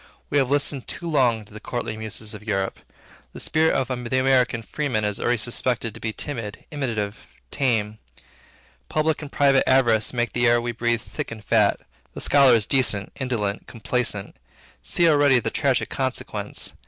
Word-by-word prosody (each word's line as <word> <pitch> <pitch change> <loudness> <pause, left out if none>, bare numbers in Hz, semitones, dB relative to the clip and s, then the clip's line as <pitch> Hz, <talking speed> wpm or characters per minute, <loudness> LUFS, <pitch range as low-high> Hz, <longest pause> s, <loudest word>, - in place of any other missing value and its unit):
We 145 - +3
have 130 -2 +1
listened 140 -2 0
too 170 - -5
long 125 -8 +2
to 100 - -18
the 110 - -8
courtly 120 -2 -4
muses 110 0 -6
of 105 - -9
Europe. 95 -3 -2 0.5
The - - -9
spirit 160 0 +2
of 130 -1 0
the 125 0 -2
American 130 -3 +2
freeman 130 -5 -2
is 105 -1 -1
already 120 0 +1
suspected 115 0 -1
to - - -11
be 110 - -3
timid, 115 -4 -6
imitative, 115 -8 -3 0.2
tame. 110 -5 0 0.9
Public 155 0 0
and 145 -2 -8
private 140 -2 +4
avarice 120 -5 +4
make 120 -1 -1
the 120 0 +2
air 120 0 +5
we 120 0 -2
breathe 120 0 0
thick - - -6
and 110 -2 -9
fat. 105 -3 +3 0.3
The - - -6
scholar 135 -4 +6
is 110 -3 +2
decent, 105 -7 +1
indolent, 115 -6 -2
complaisant. 115 -3 -2 0.4
See 170 - +2
already 145 -4 +5
the - - -3
tragic - - +1
consequence. - - -3
120 Hz, 170 wpm, -23 LUFS, 110-135 Hz, 0.9 s, scholar